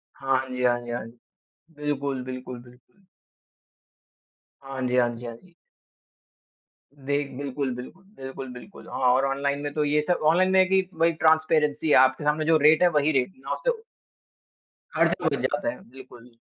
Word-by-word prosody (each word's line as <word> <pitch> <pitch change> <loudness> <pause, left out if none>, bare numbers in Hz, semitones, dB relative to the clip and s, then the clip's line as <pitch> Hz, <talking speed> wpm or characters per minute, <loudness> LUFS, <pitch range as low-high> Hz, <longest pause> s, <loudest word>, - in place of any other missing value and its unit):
हाँ। 135 -1 0
हाँ 130 0 -3
जी, 125 0 -4
हाँ 120 -1 +3
जी, 120 0 -8
हाँ 120 -2 -4
जी। 120 +1 -16 0.6
बिल्कुल, 140 -3 -3
बिल्कुल, 130 -1 -7
बिल्कुल। 125 +10 -22 1.6
हाँ 135 -1 -7
जी, 125 - -1
हाँ 120 -1 +3
जी, 120 +1 -10
हाँ 115 -1 -6
जी। 175 +7 -21 1.4
देख 140 +1 -2
बिल्कुल, 140 -1 -3
बिल्कुल, 130 +10 -10 0.2
बिल्कुल, 135 0 -7
बिल्कुल, 125 +11 -12
हाँ, - - -4
और 135 +1 +2
ऑनलाइन 140 +1 -1
में 145 - -3
तो 150 0 0
ये 150 +1 +2
सब 175 +3 0
ऑनलाइन 185 +3 +2
में 190 - +5
है 185 - +6
कि 190 0 +3
भाई 165 +1 +2
ट्रांसपेरेंसी 155 -1 +2
है, - - +5
आपके 130 +3 +4
सामने 150 +1 +1
जो 160 0 +4
रेट 155 0 +5
है - - +7
वही 150 +1 +2
रेट 130 -4 +1
है 260 - -23
ना - - -6
उससे - - 0 1.2
खर्च - - +3
हो - - +3
जाते - - -1
हैं, 295 - -9
बिल्कुल। 125 -2 -14
140 Hz, 180 wpm, -25 LUFS, 130-155 Hz, 1.6 s, है